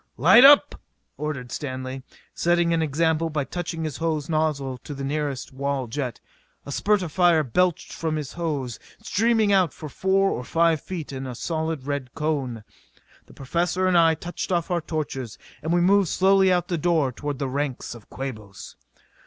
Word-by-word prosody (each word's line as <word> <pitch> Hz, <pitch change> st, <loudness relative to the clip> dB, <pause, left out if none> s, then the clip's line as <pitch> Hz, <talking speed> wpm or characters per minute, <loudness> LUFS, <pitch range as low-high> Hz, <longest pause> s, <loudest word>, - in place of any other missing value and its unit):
"Light 240 Hz, -, +7 dB
up!" 285 Hz, +1 st, +7 dB, 0.3 s
ordered 140 Hz, -5 st, -5 dB
Stanley, 130 Hz, -1 st, -5 dB, 0.3 s
setting 175 Hz, 0 st, +2 dB
an 165 Hz, -, +1 dB
example 160 Hz, +2 st, +1 dB
by 150 Hz, -2 st, -1 dB
touching 165 Hz, +2 st, -4 dB
his 155 Hz, -3 st, -4 dB
hose 160 Hz, -2 st, -2 dB
nozzle 150 Hz, -5 st, -1 dB
to 145 Hz, -, -8 dB
the 135 Hz, -, -6 dB
nearest 140 Hz, -2 st, -3 dB
wall 140 Hz, 0 st, -2 dB
jet. 125 Hz, +1 st, -4 dB, 0.5 s
A 140 Hz, -, -7 dB
spurt 205 Hz, +6 st, +1 dB
of 165 Hz, -, -5 dB
fire 175 Hz, -2 st, +4 dB
belched 175 Hz, +6 st, 0 dB
from 160 Hz, -1 st, -2 dB
his 150 Hz, -3 st, -5 dB
hose, 145 Hz, -9 st, -3 dB, 0.2 s
streaming 220 Hz, +1 st, +2 dB
out 185 Hz, -7 st, +3 dB
for 155 Hz, -, -8 dB
four 195 Hz, +5 st, +1 dB
or 125 Hz, -, -3 dB
five 165 Hz, +2 st, +2 dB
feet 165 Hz, -6 st, -6 dB
in 135 Hz, 0 st, -5 dB
a 125 Hz, -, -6 dB
solid 160 Hz, -1 st, -3 dB
red 140 Hz, -3 st, -4 dB
cone. 140 Hz, -8 st, -2 dB, 0.6 s
The -, -, -17 dB
Professor 175 Hz, +6 st, -1 dB
and 185 Hz, -1 st, +2 dB
I 165 Hz, -1 st, +5 dB
touched 175 Hz, +4 st, -6 dB
off 175 Hz, 0 st, 0 dB
our 175 Hz, -1 st, +1 dB
torches; 140 Hz, -8 st, -4 dB, 0.2 s
and 160 Hz, +2 st, -3 dB
we 175 Hz, 0 st, +3 dB
moved 195 Hz, +1 st, +4 dB
slowly 190 Hz, 0 st, +4 dB
out 180 Hz, -2 st, +1 dB
the 175 Hz, -3 st, -2 dB
door 160 Hz, -5 st, +2 dB
toward 145 Hz, +2 st, -5 dB
the 140 Hz, 0 st, -2 dB
ranks 135 Hz, -1 st, -3 dB
of 115 Hz, -3 st, -14 dB
Quabos. 110 Hz, -7 st, -8 dB
155 Hz, 180 wpm, -24 LUFS, 135-175 Hz, 0.6 s, Light